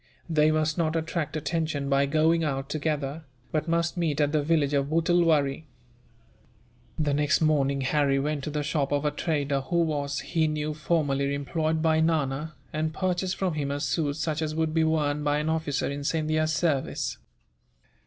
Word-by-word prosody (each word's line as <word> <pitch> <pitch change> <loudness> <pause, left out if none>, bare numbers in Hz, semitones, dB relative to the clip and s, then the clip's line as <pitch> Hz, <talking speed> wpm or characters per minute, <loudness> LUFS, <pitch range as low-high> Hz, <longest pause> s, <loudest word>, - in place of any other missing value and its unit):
They 155 -2 +3
must 155 +1 +1
not 160 -1 +1
attract 160 -1 -2
attention 155 -2 -2
by 140 0 +2
going 160 +3 +3
out 135 -2 -2
together, 150 0 -2 0.3
but 155 +1 -1
must 170 +1 0
meet 160 -4 0
at 145 -1 +2
the 155 -1 +2
village 145 -2 +1
of 140 -1 +1
Wittulwarree." 160 -3 +2 1.3
The 150 -2 +1
next 150 +1 +2
morning, 140 -3 +2
Harry 135 +1 +2
went 145 +1 -1
to - - -3
the 150 0 -2
shop 145 -2 -1
of 145 +1 0
a 150 - +2
trader 145 -4 -1
who 170 +6 +1
was, 145 -3 -2
he 160 -2 0
knew, 155 0 -2
formerly 145 -3 0
employed 155 +2 -1
by 160 -1 +3
Nana, 155 -2 0 0.2
and 155 +1 -2
purchased 185 0 -1
from 185 -3 -1
him 145 -2 -2
a 140 0 -2
suit 145 -1 -1
such 155 0 -2
as 155 -1 -2
would 160 -1 0
be 160 0 +3
worn 150 -2 +1
by 145 0 +1
an 150 +1 -1
officer 160 -3 -1
in 140 0 -4
Scindia's 155 +1 0
service. 150 -5 -1
155 Hz, 175 wpm, -27 LUFS, 145-160 Hz, 1.3 s, They